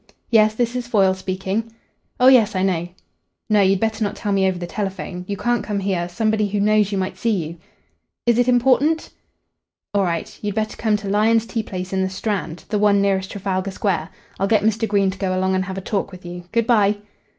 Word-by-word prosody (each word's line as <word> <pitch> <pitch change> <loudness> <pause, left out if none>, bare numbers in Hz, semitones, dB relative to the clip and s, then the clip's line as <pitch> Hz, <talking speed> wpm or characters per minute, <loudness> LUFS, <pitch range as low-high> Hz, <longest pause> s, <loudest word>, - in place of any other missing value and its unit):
Yes, 215 -1 +5
this 240 +1 -1
is 245 -1 -3
Foyle 195 -5 +3
speaking. 190 +4 -3 0.5
Oh 250 - +4
yes, 230 -5 +6
I 185 - +1
know.... 175 -3 0 0.6
No, 210 -1 +5
you'd 195 0 +3
better 220 +1 -1
not 205 - -2
tell 210 - -3
me 195 -1 +3
over 185 -1 0
the 175 - -5
telephone. 190 -1 -5
You 200 - -3
can't 240 +4 0
come 205 -1 -2
here. 185 -3 -1
Somebody 215 +3 0
who 205 +1 -1
knows 210 0 +3
you 200 - -1
might 190 0 -3
see 235 - 0 0.2
you.... 165 +2 -8 0.7
Is 235 0 +3
it 245 - +3
important?... 265 +6 +2 0.8
All 200 - +2
right. 170 -3 -2
You'd 205 -1 -3
better 215 0 -1
come 215 -2 +1
to 200 -1 -7
Lyon's 220 +3 +3
tea 230 0 -2
place 185 -2 -6
in 190 - +1
the 190 - 0
Strand 190 -4 -3
the 210 - 0
one 205 -1 +4
nearest 190 -1 +1
Trafalgar 195 -1 -2
Square. 185 -4 -1 0.3
I'll 195 - +1
get 210 -1 +3
Mr. 220 +1 +1
Green 200 -2 +2
to 190 - -11
go 185 -2 -1
along 190 0 +1
and 185 0 0
have 190 0 -6
a - - -3
talk 200 +1 -2
with 185 -1 -12
you. 175 0 -8
Good 230 0 +1
bye." 210 -3 +3
200 Hz, 220 wpm, -21 LUFS, 190-220 Hz, 0.8 s, yes